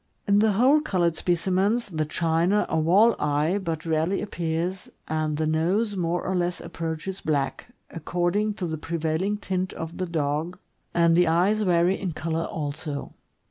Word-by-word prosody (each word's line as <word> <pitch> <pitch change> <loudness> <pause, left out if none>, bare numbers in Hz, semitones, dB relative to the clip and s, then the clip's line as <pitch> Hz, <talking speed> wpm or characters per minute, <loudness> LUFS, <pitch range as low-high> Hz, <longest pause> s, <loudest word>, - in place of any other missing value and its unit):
In 200 0 +4
the 215 -1 +3
whole 260 +9 +4
colored 175 - +1
specimens, 190 +7 +1
the 155 -3 -1
china 165 +6 +1
or 160 - +2
wall 200 +8 +5
eye 150 +6 +1
but 165 -4 -4
rarely 165 +4 +1
appears, 175 -1 -3 0.2
and 155 -1 -1
the 155 - 0
nose 180 +8 +1
more 175 -1 -1
or 190 - -1
less 175 0 -1
approaches 165 +4 -5
black, 140 -3 -1 0.2
according 175 +6 -1
to 190 - -3
the 160 -2 -4
prevailing 165 +5 -1
tint 185 -2 -3
of 165 +2 -7
the 185 - -1
dog, 155 +1 -2 0.4
and 170 -1 +4
the 175 0 +4
eyes 185 +6 +2
vary 180 -1 +2
in 185 -4 -2
color 165 +1 -2
also. 145 -1 -5
170 Hz, 160 wpm, -25 LUFS, 160-190 Hz, 0.4 s, wall